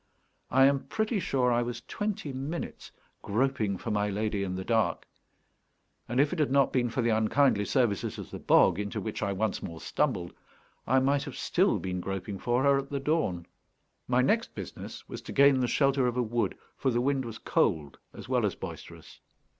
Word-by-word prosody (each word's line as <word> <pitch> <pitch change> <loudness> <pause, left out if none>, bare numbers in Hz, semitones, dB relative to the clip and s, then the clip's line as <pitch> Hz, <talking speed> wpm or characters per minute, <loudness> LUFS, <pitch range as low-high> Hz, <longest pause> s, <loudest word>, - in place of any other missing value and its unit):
I 135 - +5
am 140 0 +2
pretty 220 0 -1
sure 130 -7 +1
I 120 0 +2
was 120 -1 -4
twenty 205 -9 -3
minutes 140 +6 -5 0.3
groping 110 -3 0
for 115 - -5
my 105 0 +1
lady 105 0 -1
in 95 -2 -2
the 95 0 -5
dark; 115 -2 +1 1.0
and 120 +2 0
if 145 +3 +3
it 180 - -3
had 150 - +2
not 140 0 +3
been 120 -2 +1
for 120 +1 -1
the 115 - +2
unkindly 110 0 +3
services 120 -7 0
of - - -8
the - - -6
bog, 95 0 +4
into 100 -1 -3
which 110 - -4
I 100 -2 0
once 100 +1 -1
more 85 -3 -7
stumbled, 95 - -1 0.5
I 130 - +3
might 140 +2 +1
have 140 - -7
still 190 +3 +2
been 90 -1 -3
groping 95 +1 -4
for 120 +4 +1
her 140 -1 +4
at 140 0 -6
the 140 - -2
dawn. 135 - 0 0.6
My 125 0 +3
next 225 - +1
business - - -8
was - - -7
to - - -9
gain 140 -1 +5
the 125 - +1
shelter 135 +1 +2
of 125 0 -2
a 125 - +2
wood, 120 +1 -1 0.2
for 135 - 0
the 120 -1 +1
wind 135 +1 +1
was 115 -2 -7
cold 75 -3 0
as - - -10
well - - +1
as - - 0
boisterous. - - -9
125 Hz, 200 wpm, -29 LUFS, 105-140 Hz, 1.0 s, I